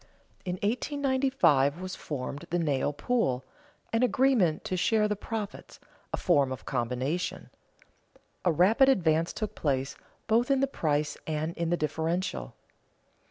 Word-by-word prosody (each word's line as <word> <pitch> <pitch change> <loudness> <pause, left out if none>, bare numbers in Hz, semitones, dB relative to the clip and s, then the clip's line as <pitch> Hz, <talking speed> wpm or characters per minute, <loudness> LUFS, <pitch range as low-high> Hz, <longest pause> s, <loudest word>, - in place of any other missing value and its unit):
In 180 - -2
1895 260 - +2
was 185 0 -5
formed 140 0 -5
the 175 - 0
nail 145 -4 +1
pool, 140 - 0 0.5
an 225 - +2
agreement 250 -10 +3
to 185 - -2
share 210 +4 +2
the 210 - -1
profits, 210 0 -6 0.3
a - - -1
form 140 -7 +2
of 130 - -6
combination. 130 +7 -2 0.9
A 180 - +3
rapid 210 - +5
advance 165 -8 +2
took 215 - -4
place, 140 -1 -1 0.3
both 230 +3 +2
in 275 -1 +3
the 275 - +3
price 150 - -1
and 155 +1 -2
in 170 -1 -1
the 175 - +1
differential. 160 - -2
175 Hz, 135 wpm, -28 LUFS, 145-225 Hz, 0.9 s, rapid